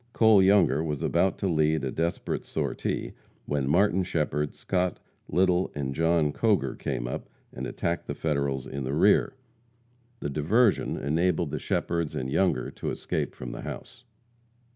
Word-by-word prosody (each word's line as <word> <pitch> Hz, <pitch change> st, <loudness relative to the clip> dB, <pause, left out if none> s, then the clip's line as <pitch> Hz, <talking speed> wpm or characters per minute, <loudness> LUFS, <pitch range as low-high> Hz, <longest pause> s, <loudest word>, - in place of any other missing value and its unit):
Cole 110 Hz, -3 st, +6 dB
Younger 95 Hz, -6 st, +4 dB
was 75 Hz, -3 st, -3 dB
about 95 Hz, -, +2 dB
to 100 Hz, -, -1 dB
lead 80 Hz, -3 st, +2 dB
a 65 Hz, -, -2 dB
desperate 85 Hz, +2 st, -2 dB
sortie, -, -, -3 dB, 0.3 s
when 70 Hz, -2 st, -1 dB
Martin 95 Hz, +4 st, +3 dB
Shepherd, 75 Hz, -4 st, -1 dB
Scott, 90 Hz, -2 st, -1 dB, 0.3 s
Little 90 Hz, +2 st, +2 dB
and 70 Hz, -2 st, -2 dB
John 80 Hz, -1 st, +2 dB
Coger 100 Hz, -, +1 dB
came -, -, -3 dB
up 60 Hz, -, -5 dB, 0.2 s
and 65 Hz, +1 st, -5 dB
attacked 85 Hz, 0 st, -3 dB
the -, -, -3 dB
Federals 70 Hz, -4 st, -1 dB
in 70 Hz, 0 st, -5 dB
the 65 Hz, +2 st, -2 dB
rear. 100 Hz, +9 st, +4 dB, 0.8 s
The 75 Hz, -, -3 dB
diversion 100 Hz, -, +2 dB
enabled 80 Hz, +2 st, 0 dB
the 75 Hz, -, -2 dB
Shepherds 85 Hz, +1 st, -1 dB
and 65 Hz, +1 st, -3 dB
Younger 95 Hz, +4 st, +1 dB
to -, -, -5 dB
escape -, -, -3 dB
from 60 Hz, -1 st, -7 dB
the -, -, -7 dB
house. 120 Hz, -, -8 dB
80 Hz, 155 wpm, -27 LUFS, 70-90 Hz, 0.8 s, Cole